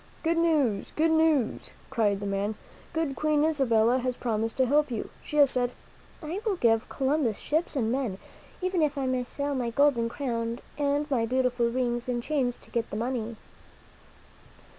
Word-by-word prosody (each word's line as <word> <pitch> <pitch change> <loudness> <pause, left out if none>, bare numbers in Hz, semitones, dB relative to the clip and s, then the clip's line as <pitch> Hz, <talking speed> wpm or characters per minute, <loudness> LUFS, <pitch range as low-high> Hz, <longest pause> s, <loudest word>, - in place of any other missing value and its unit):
"Good 330 +1 +1
news! 290 -12 +1
Good 320 +1 +3
newsl" 315 -6 +2 0.2
cried 210 -6 +1
the - - -3
man. 200 +2 -1 0.4
"Good 320 -4 -1
Queen 300 0 +2
Isabella 250 -5 +3
has 250 0 -2
promised 225 -1 -2
to 260 - +4
help 295 +3 +3
you. 230 -4 -4
She 300 - -4
has 285 -2 +6
said: 245 -1 0 0.3
* - - -23
I 340 +7 -4
will 430 -4 +1
give 225 -7 +2
Columbus 270 -5 0
ships 315 +1 -1
and 230 -5 +1
men, 250 -7 -1 0.5
even 370 -2 +1
if 295 -1 +1
I 275 - -1
must 255 -1 -1
sell 285 0 -2
my 250 -3 -1
golden 235 -2 +3
crown 230 -3 -2 0.2
and 285 0 +1
my 230 -4 +2
beautiful 250 -1 +1
rings 240 0 -1
and 240 -1 -1
chains 260 -5 -1
to - - -19
get 230 -1 -1
the 210 - -4
money.'" 235 -1 -2
255 Hz, 180 wpm, -28 LUFS, 230-295 Hz, 0.5 s, has